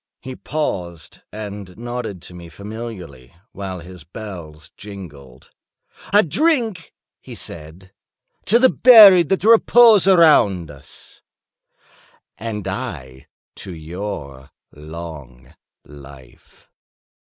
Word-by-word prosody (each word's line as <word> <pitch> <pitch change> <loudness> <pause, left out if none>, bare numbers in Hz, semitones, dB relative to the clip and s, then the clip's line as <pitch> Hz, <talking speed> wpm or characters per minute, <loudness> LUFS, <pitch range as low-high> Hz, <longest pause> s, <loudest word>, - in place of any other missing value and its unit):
He 130 0 -9
paused 90 - -5
and 100 -3 -9
nodded 120 -6 -6
to - - -11
me 85 -1 -12
familiarly, 95 - -10 0.2
while 95 -3 -7
his 90 -1 -13
bells 85 -5 -11
jingled. 75 -11 -13 0.6
"I 205 +2 +5
drink," 225 - -1 0.2
he - - -12
said, 85 +4 -10 0.5
"to 225 - +4
the 260 +2 +4
buried 200 - +7
that 190 - 0
repose 225 -2 +5
around 125 - +4
us." 70 -1 -13 1.2
"And 105 -3 -6
I 75 - -7 0.3
to 95 - -8
your 80 -5 -8 0.2
long 75 -5 -11 0.3
life." 70 -3 -17
95 Hz, 95 wpm, -19 LUFS, 75-130 Hz, 1.2 s, buried